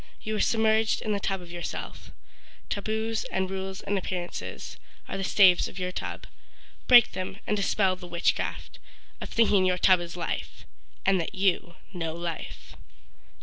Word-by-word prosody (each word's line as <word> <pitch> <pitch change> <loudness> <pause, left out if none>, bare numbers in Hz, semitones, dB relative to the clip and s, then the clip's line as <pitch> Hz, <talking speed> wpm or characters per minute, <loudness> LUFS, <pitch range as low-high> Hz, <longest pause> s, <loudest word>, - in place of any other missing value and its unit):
You 215 0 -2
are - - -2
submerged 220 -1 +2
in 215 - -2
the 205 - 0
tub 195 -1 -2
of 175 -1 -11
yourself— 175 0 -6 0.6
Taboos 220 +2 -1
and 190 0 -2
rules 190 0 -4
and 200 0 -1
appearances, 180 -1 -5 0.3
Are - - -5
the 195 - -3
staves 190 -2 +5
of - - -11
your 180 -1 -2
tub. - - -5 0.6
Break 240 -2 +8
them 185 +1 -5
and 210 - 0
dispel 195 -2 +2
the 180 -1 -11
witchcraft 170 0 -1 0.4
Of - - -6
thinking 210 -4 +3
your 185 -1 +2
tub 185 0 +5
is 175 0 -7
life 170 - -4 0.4
And 190 -2 +3
that 170 - -6
you 185 -2 +1 0.2
know 165 -3 -3
life. 170 -1 -6
190 Hz, 160 wpm, -27 LUFS, 180-210 Hz, 0.6 s, Break